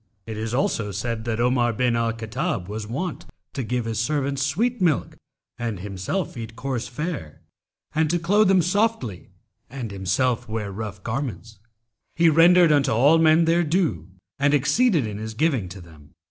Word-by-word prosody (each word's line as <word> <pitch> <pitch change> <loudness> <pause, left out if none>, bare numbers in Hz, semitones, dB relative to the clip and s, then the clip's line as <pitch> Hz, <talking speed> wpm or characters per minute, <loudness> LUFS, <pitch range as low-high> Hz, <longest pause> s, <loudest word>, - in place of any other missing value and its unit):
'[FN#279] 115 - -7
It 110 - -5
is 110 +1 -3
also 115 -5 0
said 110 +3 -3
that 115 -1 -2
Omar 120 -1 +2
bin 120 +1 +1
al 115 0 +1
Khattab 115 - -3
was 105 +1 -5
wont 165 +9 -4 0.3
to 135 - -3
give 120 0 -2
his 115 -2 -2
servants 140 +2 -1
sweet 225 - 0
milk 165 -6 +1 0.4
and 115 -5 -3
himself 100 - -3
eat 115 -1 -7
coarse 130 -3 -3
fare, 140 - -5 0.5
and 155 0 +1
to 175 - +2
clothe 200 +5 +3
them 190 -2 +4
softly 185 - -1 0.4
and 125 -3 -6
himself 110 +6 0
wear 110 -2 -3
rough 100 -2 -6
garments. 115 -3 -5 0.6
He 165 0 +5
rendered 170 +1 +6
unto 145 -2 +3
all 140 +9 +5
men 160 +1 +5
their 170 +1 +3
due, 155 - 0 0.3
and 140 +1 +3
exceeded 165 - +2
in 105 -1 -5
his 110 0 -6
giving 130 - 0
to 95 +2 -9
them. 80 -1 -17
125 Hz, 175 wpm, -23 LUFS, 110-160 Hz, 0.6 s, rendered